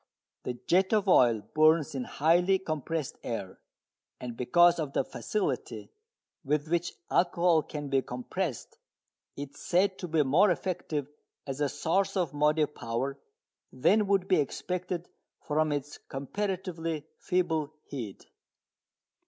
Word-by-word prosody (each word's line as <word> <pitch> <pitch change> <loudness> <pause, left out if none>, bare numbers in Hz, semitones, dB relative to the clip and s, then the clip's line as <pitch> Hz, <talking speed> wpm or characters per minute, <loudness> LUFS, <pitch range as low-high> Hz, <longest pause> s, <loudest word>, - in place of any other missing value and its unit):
The 125 - -2
jet 190 +4 +3
of 210 -2 +2
oil 120 - +5
burns 155 0 +4
in 130 -2 -3
highly 175 +5 +3
compressed 155 -4 -3
air. 100 -6 -5 0.6
And 120 -2 -6
because 170 +8 +4
of 145 -3 -3
the - - +2
facility 210 +9 -3 0.5
with 150 +1 0
which 175 +1 0 0.2
alcohol 175 -2 +3
can 150 -1 -6
be 135 -1 +3
compressed 130 - -4 0.6
it 140 -1 -6
is - - -16
said 190 +2 +2
to 180 - -4
be 160 -2 +2
more 160 +10 +4
effective 165 -5 -2 0.4
as 135 +1 -5
a 145 - +2
source 190 +7 0
of 170 -6 0
motive 150 +1 +2
power 130 +4 -3 0.5
than 200 +11 +3
would 195 -2 +2
be 185 - +4
expected 175 +4 -2 0.3
from 155 0 0
its 145 0 -4
comparatively 165 0 -4
feeble 160 -4 0
heat. 115 -9 -7
155 Hz, 130 wpm, -29 LUFS, 140-180 Hz, 0.6 s, oil